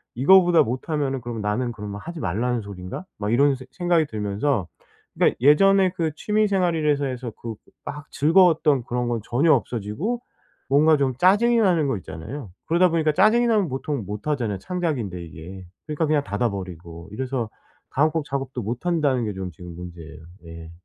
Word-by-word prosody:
이거보다 175 +5 +6
못하면은 135 +2 -2
그럼 115 -2 -5
나는 120 +4 -1
그러면 105 -1 -7
하지 170 -1 -7
말라는 115 +6 -1
소리인가?' 100 - -8
막 105 +1 -2
이런 140 +2 +4
생 130 0 -11
생각이 175 -3 +1
들면서 105 - -1 0.5
그러니까 - - +3
예전에 190 +6 +5
그 160 -3 -1
취미 210 +3 +1
생활이라고 160 -7 +1
해서 125 -2 -5
그 115 -2 -5 0.3
막 150 +1 -7
즐거웠던 155 -5 +4
그런 125 0 -2
건 115 -1 -1
전혀 145 +6 +3
없어지고 125 - -2 0.5
뭔가 155 +3 +5
좀 135 -2 +1
짜증이 215 - +4
나는 175 -9 +3
거 130 -6 0
있잖아요. 105 - -8 0.2
그러다 170 +3 +4
보니까 160 -2 +2
짜증이 230 +7 +4
나면 210 -6 +2
보통 135 -3 -3
못 105 +8 -6
하잖아요 120 -9 -1
창작인데 125 - -3
이게. 90 +4 -10 0.2
그러니까 155 +1 -1
그냥 150 -2 +2
닫아 105 +4 -1
버리고 85 -2 -8
이래서 125 -1 -3 0.4
다음 155 +3 +2
곡 160 -2 -1
작업도 135 -3 -4
못 120 - -5
한다는 145 -8 +1
게 105 - -3
좀 95 -1 -5
지금 85 +1 -11
문제예요. 85 -3 -10 0.3
예. 80 0 -10
130 Hz, 390 characters per minute, -23 LUFS, 105-160 Hz, 0.5 s, 이거보다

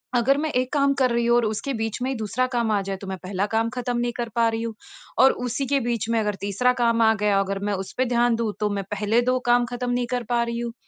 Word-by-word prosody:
अगर 255 +3 +3
मैं 310 +1 -1
1 255 0 0
काम 280 -1 +3
कर 255 -1 +3
रही 235 0 +1
हूँ 235 0 +4
और 235 - +2
उसके 220 +6 -2
बीच 225 +2 -3
में 255 - -1
ही - - -2
दूसरा 225 +4 -1
काम 230 -2 +1
आ 205 -1 +2
जाए 195 0 -4
तो 200 - -7
मैं 190 0 -4
पहला 195 +1 -1
काम 225 +1 +1
ख़त्म 245 -1 -2
नहीं 240 0 0
कर 235 -1 -3
पा 230 -1 +3
रही 225 0 -3
हूँ 230 -1 -4 0.5
और 265 - +7 0.2
उसी 275 +4 -2
के 275 - +4
बीच 230 -1 -2
में 230 - +2
अगर 210 -2 -1
तीसरा 205 +6 +1
काम 230 0 +3
आ 220 0 +5
गया 200 -1 +3
अगर 195 0 -1
मैं 205 - 0
उस - - -12
पे 255 - +2
ध्यान 240 0 +3
दूँ 225 -2 -2
तो 210 - +1
मैं - - -3
पहले 210 +3 +1
2 255 - +1
काम 240 0 +4
ख़त्म 245 0 -2
नहीं 245 0 0
कर 245 -1 -1
पा 240 -1 +2
रही 235 0 -3
हूँ। 235 -1 -4
235 Hz, 290 wpm, -24 LUFS, 210-245 Hz, 0.5 s, और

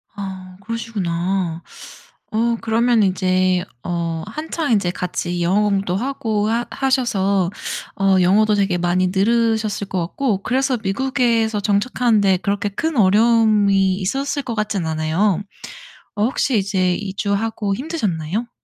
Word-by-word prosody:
아 190 -2 -7
그러시구나. 190 -6 -2 0.7
어 230 +2 +1
그러면 230 0 +2
이제 185 -1 +1 0.2
어 170 -2 -2
한창 305 +4 -3
인제 195 -5 +2
같이 175 -1 -3
영어 190 +5 +2
공부도 195 -3 0
하고 220 -3 -1
하 235 +1 0
하셔서 200 -9 +1 0.5
어 195 -1 +4
영어도 210 +4 +4
되게 195 -3 +1
많이 175 +1 +1
늘으셨을 220 +1 +1
것 185 - -2
같고 205 -1 -2
그래서 265 +1 +1
미국에서 230 0 +1
정착하는 220 +2 +1
데 190 -2 +3
그렇게 200 +2 -1
큰 310 +9 -2
어려움이 205 -2 +4
있었을 270 +9 -2
것 235 -3 -4
같진 210 -4 -1
않아요. 160 +5 0 0.8
어 205 - +1
혹시 250 -1 +1
이제 190 -2 +1
이주하고 200 +1 -2
힘드셨나요? 220 - -3
205 Hz, 285 characters per minute, -20 LUFS, 185-230 Hz, 0.8 s, 어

